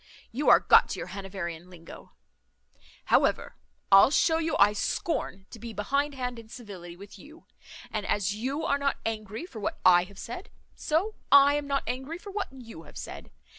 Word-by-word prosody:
You 275 Hz, +6 st, 0 dB
are -, -, +8 dB
got -, -, +5 dB
to -, -, -4 dB
your -, -, -6 dB
Hanoverian 180 Hz, -3 st, -6 dB
linguo. 165 Hz, -2 st, -13 dB, 1.0 s
However, -, -, +2 dB, 0.4 s
I'll 195 Hz, +5 st, +8 dB
shew 320 Hz, +2 st, +2 dB
you 325 Hz, 0 st, -1 dB
I 205 Hz, +1 st, +5 dB
scorn 200 Hz, -, -3 dB
to 230 Hz, -, -10 dB
be 230 Hz, +1 st, -8 dB
behind 280 Hz, +8 st, -1 dB
hand 250 Hz, -2 st, -4 dB
in 225 Hz, -1 st, -14 dB
civility 190 Hz, -8 st, -10 dB
with 200 Hz, +2 st, -13 dB
you; 310 Hz, +3 st, -15 dB, 0.5 s
and 215 Hz, -2 st, -2 dB
as 200 Hz, -1 st, 0 dB
you 270 Hz, +9 st, -3 dB
are 280 Hz, -2 st, +1 dB
not 280 Hz, 0 st, 0 dB
angry 215 Hz, -, -4 dB
for 245 Hz, -11 st, -10 dB
what 205 Hz, -, -3 dB
I 175 Hz, -1 st, +6 dB
have 200 Hz, +1 st, -16 dB
said, 245 Hz, -, -8 dB, 0.2 s
so 350 Hz, +8 st, -1 dB, 0.2 s
I 280 Hz, 0 st, +7 dB
am 290 Hz, -1 st, -2 dB
not 280 Hz, -1 st, 0 dB
angry 265 Hz, +6 st, -4 dB
for 400 Hz, +2 st, -10 dB
what 410 Hz, 0 st, -3 dB
you 235 Hz, -10 st, -11 dB
have -, -, -14 dB
said. -, -, -8 dB
230 Hz, 185 wpm, -27 LUFS, 195-285 Hz, 1.0 s, are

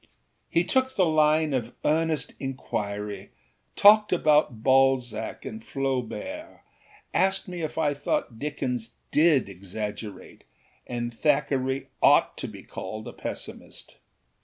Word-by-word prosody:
â -, -, -29 dB, 0.4 s
He 170 Hz, -, +2 dB
took 260 Hz, +6 st, 0 dB
the 185 Hz, -, +4 dB
line 155 Hz, -1 st, +3 dB
of 120 Hz, -2 st, -2 dB
earnest 160 Hz, -1 st, +1 dB
inquiry, 105 Hz, -6 st, -4 dB, 0.5 s
talked 210 Hz, +1 st, +7 dB
about 150 Hz, -9 st, +3 dB
Balzac 130 Hz, -4 st, +2 dB
and 220 Hz, 0 st, -7 dB
Flaubert, 135 Hz, -, -4 dB, 0.5 s
asked 190 Hz, 0 st, +2 dB
me 180 Hz, -2 st, -5 dB
if 155 Hz, -, -4 dB
I 150 Hz, -2 st, +2 dB
thought 130 Hz, -5 st, -2 dB
Dickens 125 Hz, -6 st, -3 dB, 0.2 s
did 150 Hz, -6 st, +4 dB
exaggerate 100 Hz, +2 st, -7 dB, 0.4 s
and 120 Hz, -1 st, -3 dB
Thackeray 135 Hz, -1 st, +1 dB, 0.2 s
ought -, -, +5 dB
to -, -, -4 dB
be -, -, -10 dB
called 110 Hz, 0 st, -7 dB
a -, -, -7 dB
pessimist. -, -, -8 dB
135 Hz, 120 wpm, -26 LUFS, 120-160 Hz, 0.5 s, talked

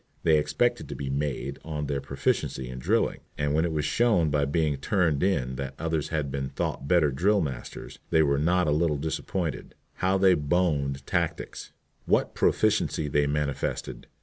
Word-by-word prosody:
They 80 Hz, -2 st, +5 dB
expected 120 Hz, +12 st, 0 dB
to -, -, -5 dB
be 70 Hz, -2 st, -4 dB
"made" 70 Hz, -1 st, -2 dB
on 75 Hz, -2 st, -4 dB
their 70 Hz, -1 st, -2 dB
proficiency 65 Hz, -1 st, -1 dB
in 65 Hz, 0 st, -6 dB
drilling, -, -, +1 dB, 0.2 s
and 75 Hz, 0 st, 0 dB
when 80 Hz, +2 st, +2 dB
it 85 Hz, -, -1 dB
was 75 Hz, -2 st, -1 dB
shown 90 Hz, -4 st, +2 dB
by 70 Hz, 0 st, +2 dB
being 75 Hz, 0 st, 0 dB
"turned 80 Hz, -2 st, +1 dB
in" 65 Hz, -10 st, 0 dB
that 70 Hz, 0 st, -5 dB
others 80 Hz, -1 st, -1 dB
had 75 Hz, -4 st, -2 dB
been 70 Hz, -1 st, -3 dB
thought 70 Hz, -, -3 dB
better 80 Hz, -3 st, +4 dB
drill 100 Hz, +10 st, +2 dB
masters, 65 Hz, -8 st, -5 dB
they 80 Hz, -, +4 dB
were 70 Hz, -1 st, +2 dB
not 90 Hz, +4 st, +2 dB
a 75 Hz, -, +1 dB
little 75 Hz, 0 st, +2 dB
disappointed. 80 Hz, +1 st, -3 dB, 0.2 s
How 95 Hz, +1 st, +2 dB
they 95 Hz, -1 st, +5 dB
"boned" 75 Hz, -4 st, 0 dB
tactics! -, -, -2 dB, 0.4 s
What -, -, +2 dB
proficiency 75 Hz, -2 st, +1 dB
they 75 Hz, 0 st, +2 dB
manifested! 70 Hz, -1 st, -2 dB
75 Hz, 175 wpm, -27 LUFS, 70-85 Hz, 0.4 s, They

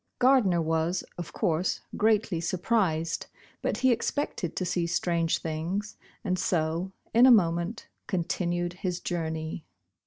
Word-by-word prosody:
Gardner 235 Hz, -10 st, +4 dB
was, 160 Hz, +3 st, 0 dB, 0.2 s
of 175 Hz, -, -5 dB
course, 170 Hz, +2 st, 0 dB
greatly 210 Hz, -5 st, +2 dB
surprised, 170 Hz, -2 st, 0 dB, 0.3 s
but -, -, -1 dB
he 260 Hz, -1 st, +4 dB
expected 235 Hz, -, -1 dB
to 185 Hz, -, -1 dB
see 175 Hz, -1 st, 0 dB
strange 170 Hz, -1 st, +1 dB
things, 170 Hz, +6 st, -3 dB, 0.3 s
and 185 Hz, -4 st, 0 dB
so, 170 Hz, +1 st, 0 dB, 0.2 s
in 240 Hz, +3 st, +7 dB
a -, -, +8 dB
moment, 175 Hz, 0 st, +2 dB, 0.2 s
continued 175 Hz, -1 st, -1 dB
his 180 Hz, -2 st, -1 dB
journey. 160 Hz, -2 st, -3 dB
175 Hz, 125 wpm, -28 LUFS, 165-200 Hz, 0.3 s, a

